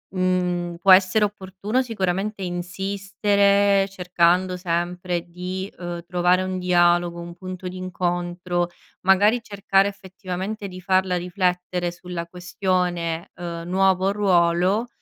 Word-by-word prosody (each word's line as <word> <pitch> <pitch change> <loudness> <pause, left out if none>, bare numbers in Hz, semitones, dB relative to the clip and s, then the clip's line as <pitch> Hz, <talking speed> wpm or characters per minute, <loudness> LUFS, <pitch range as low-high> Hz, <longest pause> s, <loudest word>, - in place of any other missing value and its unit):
mhmm 185 -1 +1 0.3
può 190 +2 +5
essere 190 +3 +5
opportuno 205 +4 -2
sicuramente 195 -3 -2
insistere, 195 +2 +1
cercando 180 0 +1
sempre 175 0 -2
di, 185 +3 -5
ehm, 175 -1 -5
trovare 180 +1 +2
un 185 0 -3
dialogo, 175 -1 +2
un 170 0 -8
punto 185 0 -7
d'incontro, 175 -1 -2 0.3
magari 205 +5 +4
cercare 200 -2 +2
effettivamente 195 +1 -6
di 185 -1 -9
farla 185 0 +2
riflettere 180 -1 -1
sulla 175 -1 -6
questione, 175 -2 -2
ehm, 170 -1 -6
nuovo 190 0 +3
ruolo, 185 +2 +2
185 Hz, 110 wpm, -23 LUFS, 175-195 Hz, 0.3 s, può